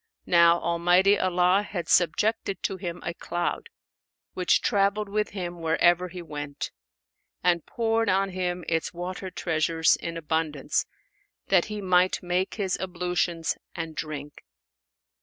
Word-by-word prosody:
Now 170 -1 +5
Almighty 175 +4 +3
Allah 180 +1 +3
had 185 -5 -5
subjected 195 +3 +1
to 195 - -1
him 175 -2 -6
a 175 - -2
cloud 175 - -3 0.6
which 180 - +2
travelled 200 -1 +1
with 210 +1 0
him 175 -3 -6
wherever 175 +2 +3
he 180 0 -8
went, 145 -3 -6 0.7
and 175 -2 +3
poured 225 -1 0
on 195 +1 +2
him 180 -1 -3
its 165 +1 -1
water 185 +2 -5
treasures 165 -2 +2
in 165 0 -5
abundance 160 -3 -1 0.6
that 185 -3 +4
he 210 -1 -5
might 185 -1 +2
make 180 +2 -1
his 195 -4 -1
ablutions 180 -2 -1 0.2
and 165 -1 -5
drink. 150 -2 -6
180 Hz, 130 wpm, -26 LUFS, 170-190 Hz, 0.7 s, Now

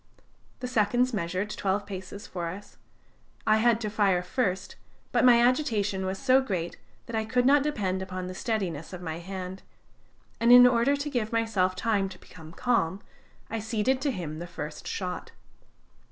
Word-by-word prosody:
The 250 - -3
seconds 245 +2 +2
measured 185 +1 -2
twelve 200 0 -1
paces 195 +1 -7
for 175 -2 -4
us. 195 +5 -8 0.7
I 215 0 +4
had 230 0 +3
to 215 - -2
fire 195 -4 +2
first, 190 -1 -2 0.4
but - - +2
my 245 -2 +7
agitation 220 -7 +1
was 190 +1 -2
so 265 +3 +4
great, 185 -9 -3 0.3
that 235 - -6
I 220 - +1
could 245 +3 +1
not 285 +2 +6
depend 200 -10 -1
upon 185 -1 -5
the 185 - -5
steadiness 185 - -3
of 180 0 -7
my 160 -1 -4
hand; 185 +1 -6 0.8
and 235 +1 +4
in 245 0 +10
order 250 +3 +4
to 285 +1 -3
give 235 -5 -1
myself 220 -5 +1
time 200 0 0
to 185 - -11
become 160 -4 -13
calm, 195 -3 0 0.5
I 225 - -3
ceded 225 +4 0
to 290 - +1
him 165 - -4
the 175 - -6
first 150 -3 -7
shot. 180 -2 -4
205 Hz, 170 wpm, -28 LUFS, 185-240 Hz, 0.8 s, in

